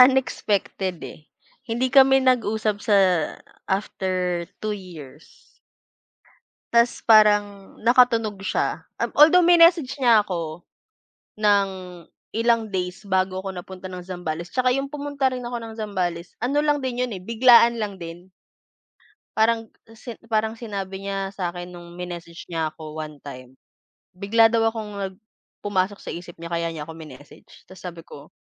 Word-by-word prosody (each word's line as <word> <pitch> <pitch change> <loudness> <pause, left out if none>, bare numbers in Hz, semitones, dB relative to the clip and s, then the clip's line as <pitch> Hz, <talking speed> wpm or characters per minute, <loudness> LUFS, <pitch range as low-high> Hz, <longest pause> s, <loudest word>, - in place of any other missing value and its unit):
unexpected 210 -7 +2
eh. 155 - -11 0.4
Hindi 245 +3 -1
kami 270 -1 +6
nag-usap 220 -4 +1
sa 205 0 +2 0.7
after 185 -3 -2 0.2
2 215 - 0
years. 160 -7 -10 1.4
Tas, 235 +1 +2
parang, 205 -2 +4
nakatunog 230 -3 +3
siya, - - -1 0.2
um, - - 0
although 320 +5 +8
minessage 335 -4 +6
niya 235 -5 +5
ako 170 -4 -5 0.7
ng 205 -2 +3 0.6
ilang 230 -1 +1
days 180 +1 -3
bago 190 -1 -1
ako 195 - -4
napunta 185 +1 -9
ng 180 - -6
Zambales. 175 -2 -5
Tsaka 255 +2 +1
yung 275 +2 -1
pumunta 285 -1 -1
rin 255 -1 -5
ako 240 0 -4
ng 225 -1 -9
Zambales, 180 -5 -3
ano 280 +5 +1
lang 295 -1 +2
din 250 -1 -2
'yon 245 - -5
eh, 190 - -6
biglaan 235 +2 +5
lang 205 -4 -4
din. 175 +2 -10 1.0
Parang, 225 0 +2 0.2
si 225 +1 -9
parang 220 0 -1
sinabi 195 -3 -6
niya 195 -1 -3
sa'kin 175 -2 -5
no'ng, 175 -1 -12
minessage 175 -1 -8
niya 165 -2 -1
ako 155 -1 -9
one 155 -2 -7
time, 130 -2 -10 0.6
bigla 225 +4 +4
daw 225 0 +2
akong 220 -2 -6
nag 195 -1 -4 0.5
pumasok 200 0 -1
sa - - -8
isip 175 0 -9
niya 170 0 -8
kaya 170 0 -1
niya 150 -2 -7
ako 160 - -9
minessage 145 -3 -14
tapos 185 0 -14
sabi 170 -2 -8
ko 145 +2 -13
200 Hz, 145 wpm, -23 LUFS, 175-235 Hz, 1.4 s, although